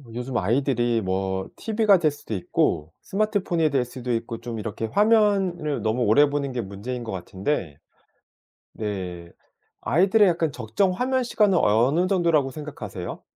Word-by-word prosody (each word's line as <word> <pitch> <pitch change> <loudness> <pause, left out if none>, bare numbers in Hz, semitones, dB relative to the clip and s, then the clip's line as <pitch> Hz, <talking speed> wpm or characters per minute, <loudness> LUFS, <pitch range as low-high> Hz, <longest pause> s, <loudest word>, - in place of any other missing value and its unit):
요즘 125 +1 -3
아이들이 120 +1 +1
뭐 95 0 -2
TV가 215 -4 +3
될 155 -3 +3
수도 145 -6 -8
있고 80 -4 0
스마트폰이 195 -6 0
될 135 -3 +1
수도 125 0 -6
있고 115 0 -3
좀 120 -1 -5
이렇게 110 +1 -4
화면을 195 - +2
너무 110 +3 0
오래 140 +7 +5
보는 140 -1 -2
게 125 -1 -2
문제인 110 +5 -6
것 115 - -6
같은데 95 - -3 1.0
네 90 -5 -5 0.5
아이들의 195 - +4
약간 165 -3 0
적정 125 - 0
화면 255 +6 0
시간은 210 -5 +2
어느 125 - +3
정도라고 170 -8 +2
생각하세요? 125 - -7
130 Hz, 320 characters per minute, -24 LUFS, 110-180 Hz, 1.0 s, 오래